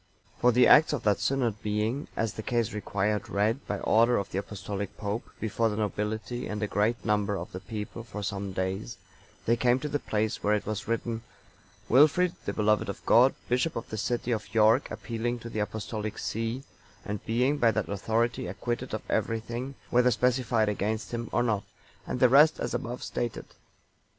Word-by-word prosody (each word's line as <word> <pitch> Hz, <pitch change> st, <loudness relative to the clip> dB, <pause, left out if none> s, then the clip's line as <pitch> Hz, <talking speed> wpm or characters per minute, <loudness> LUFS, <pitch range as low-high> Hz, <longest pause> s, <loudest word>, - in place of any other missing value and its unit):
For 125 Hz, -, +5 dB
the 125 Hz, +1 st, +5 dB
acts 155 Hz, 0 st, +7 dB
of 140 Hz, -, -2 dB
that 105 Hz, -2 st, +2 dB
synod 115 Hz, -1 st, 0 dB
being, 110 Hz, +6 st, -1 dB
as 110 Hz, -2 st, 0 dB
the -, -, -5 dB
case 115 Hz, -1 st, 0 dB
required, 105 Hz, 0 st, -1 dB
read, 110 Hz, +5 st, +1 dB
by 105 Hz, -, -1 dB
order 115 Hz, +2 st, +4 dB
of 100 Hz, -, -3 dB
the 95 Hz, -, -1 dB
Apostolic 100 Hz, 0 st, -5 dB
Pope, 105 Hz, +3 st, -3 dB
before 115 Hz, +1 st, 0 dB
the 105 Hz, -, -3 dB
nobility 110 Hz, +4 st, -2 dB
and 105 Hz, -, -4 dB
a -, -, +1 dB
great 105 Hz, +4 st, 0 dB
number 105 Hz, -2 st, +1 dB
of 85 Hz, -, -6 dB
the 90 Hz, -, -6 dB
people 110 Hz, +2 st, -6 dB
for 105 Hz, -2 st, -7 dB
some 100 Hz, -1 st, -3 dB
days, 95 Hz, -8 st, -3 dB, 0.5 s
they 115 Hz, -, +4 dB
came 120 Hz, +1 st, +3 dB
to 150 Hz, -, -3 dB
the 145 Hz, 0 st, -1 dB
place 110 Hz, -3 st, -1 dB
where 105 Hz, +1 st, +3 dB
it 105 Hz, -, -3 dB
was 110 Hz, +2 st, -4 dB
written, 115 Hz, 0 st, -2 dB, 0.7 s
"Wilfrid, 155 Hz, +7 st, +5 dB
the -, -, -1 dB
beloved 105 Hz, -1 st, +2 dB
of 100 Hz, -, -7 dB
God, 125 Hz, +3 st, +6 dB
bishop 125 Hz, +7 st, +1 dB
of 115 Hz, -, -5 dB
the -, -, -2 dB
city 120 Hz, +3 st, -1 dB
of 105 Hz, -4 st, -2 dB
York, 110 Hz, +4 st, +4 dB
appealing 120 Hz, +1 st, -3 dB
to 115 Hz, 0 st, -9 dB
the 110 Hz, -, -3 dB
Apostolic 110 Hz, 0 st, -3 dB
see, 115 Hz, +4 st, -3 dB, 0.4 s
and 105 Hz, -1 st, -4 dB
being 125 Hz, +6 st, +2 dB
by 115 Hz, -, +5 dB
that 110 Hz, -, 0 dB
authority 110 Hz, +2 st, 0 dB
acquitted 120 Hz, +6 st, -3 dB
of -, -, -6 dB
everything, 120 Hz, +4 st, -2 dB, 0.2 s
whether 125 Hz, +1 st, +5 dB
specified 120 Hz, -2 st, +2 dB
against 105 Hz, 0 st, -2 dB
him 115 Hz, -1 st, -3 dB
or 120 Hz, -, +2 dB
not," 105 Hz, -4 st, 0 dB, 0.4 s
and -, -, -3 dB
the 125 Hz, -, +7 dB
rest 145 Hz, +5 st, +6 dB
as -, -, -2 dB
above 120 Hz, +1 st, -4 dB
stated. 120 Hz, -2 st, -3 dB
110 Hz, 190 wpm, -28 LUFS, 105-120 Hz, 0.7 s, acts